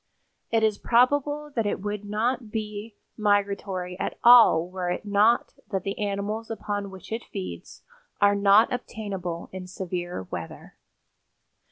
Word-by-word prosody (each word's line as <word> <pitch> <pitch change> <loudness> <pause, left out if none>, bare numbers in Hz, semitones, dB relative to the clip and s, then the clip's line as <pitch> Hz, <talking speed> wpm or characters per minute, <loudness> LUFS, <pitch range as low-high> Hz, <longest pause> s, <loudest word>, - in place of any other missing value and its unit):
It 225 -1 +2
is 215 -2 +2
probable 290 +5 +2
that 225 -3 +1
it - - -1
would 205 +1 -4
not 225 +3 -1
be 215 0 -5 0.2
migratory 200 -3 0
at - - -3
all 230 -9 +8
were 180 -1 -4
it 180 - -3
not 210 +3 +3 0.2
that 190 -2 -2
the 200 +1 -4
animals 205 +2 -2
upon 205 -2 -3
which 190 +1 -12
it 225 +1 -4
feeds 90 -2 -7 0.4
are 205 0 +5
not 200 +3 +5
obtainable 195 -8 -5
in 185 -1 -7
severe 180 - -4
weather. 85 -2 -7
205 Hz, 140 wpm, -26 LUFS, 190-225 Hz, 0.4 s, all